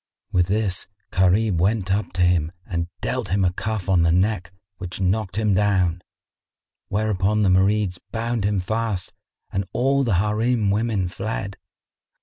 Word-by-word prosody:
With 90 -4 +2
this 100 -2 -1 0.2
Gharib 95 +1 +3
went 95 0 +1
up 105 +2 -1
to 90 0 +1
him 85 -3 +2
and 85 -2 -2
dealt - - -2
him 95 +1 +2
a 90 - +1
cuff 110 -1 -3
on 95 -3 +4
the 85 0 +3
neck 95 0 +1 0.3
which 90 -1 -6
knocked 95 0 0
him 105 -1 +2
down; 95 -3 +2 0.9
whereupon 105 0 +1
the 100 - +4
Marids 95 0 +2
bound 115 -1 -1
him 100 0 +1
fast 110 0 -2 0.4
and 95 - 0
all 135 +3 +2
the 115 -7 +1
Harim 105 +2 +1
women 105 -3 0
fled. 100 +1 -4
100 Hz, 150 wpm, -23 LUFS, 90-110 Hz, 0.9 s, on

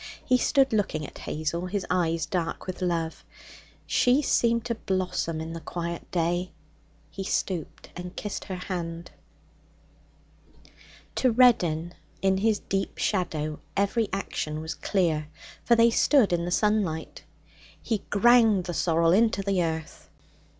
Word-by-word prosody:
He 255 -1 +3
stood 270 -1 +3
looking 190 -8 0
at - - -11
Hazel, 170 +3 -3
his 195 +1 -2
eyes 165 -2 +1
dark 175 -4 -3
with 185 -1 -6
love. 170 -3 -2 0.6
She 255 +4 +3
seemed 235 -3 +2
to 240 - -1
blossom 180 -6 -2
in 160 +1 -5
the 165 - -5
quiet 170 0 -5
day. 175 +1 -1 0.6
He 195 - -5
stooped 185 -3 -3
and 180 +1 -7
kissed 210 - -5
her 190 - -5
hand. 170 -2 -5 2.1
To 255 - +3
Reddin 175 -9 +3 0.3
in 190 0 +2
his 215 +1 +2
deep 195 0 -3
shadow 155 -6 -1 0.2
every 200 +2 +1
action 155 -5 -3
was 160 +1 -4
clear, 165 -6 0 0.4
for 235 - +4
they 230 0 +5
stood 235 -5 +4
in 170 0 0
the - - -2
sunlight. 190 -5 0 0.6
He 225 -3 -1
ground 225 -2 +5
the 175 -1 -4
sorrel 165 -1 +2
into 210 0 +3
the 195 -2 +1
earth. 160 -1 -5
185 Hz, 135 wpm, -26 LUFS, 165-215 Hz, 2.1 s, they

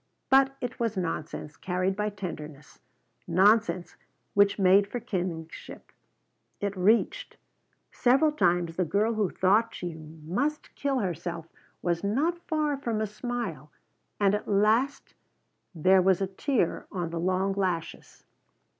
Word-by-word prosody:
But 270 0 +5
it 245 0 -5
was 230 -3 -1
nonsense 155 -3 -4
carried 185 +1 -1
by 210 +1 -1
tenderness. 155 -7 -8 0.5
Nonsense 185 0 +3 0.4
which 200 0 +4
made 195 +1 +5
for 245 - -4
kinship. 175 -7 -5 0.7
It 200 0 -2
reached. 220 - +1 0.5
Several 270 +5 +3
times 175 - +1
the 185 - +2
girl 205 +7 +1
who 210 -4 0
thought 210 +5 +2
she 175 -2 -5
must 165 - -4
kill 280 -1 -1
herself 170 -2 -4 0.4
was 170 0 0
not 295 +12 0
far 305 -3 0
from 235 -5 -2
a 215 - 0
smile 210 - -5 0.5
and 200 -1 +3
at 210 - -2
last 220 +7 +1 0.6
there 185 +4 +5
was 185 -1 +3
a 195 - +1
tear 195 - -1
on 175 -4 -3
the 170 - -3
long 185 +2 +1
lashes. 185 -4 -3
195 Hz, 130 wpm, -28 LUFS, 175-230 Hz, 0.7 s, But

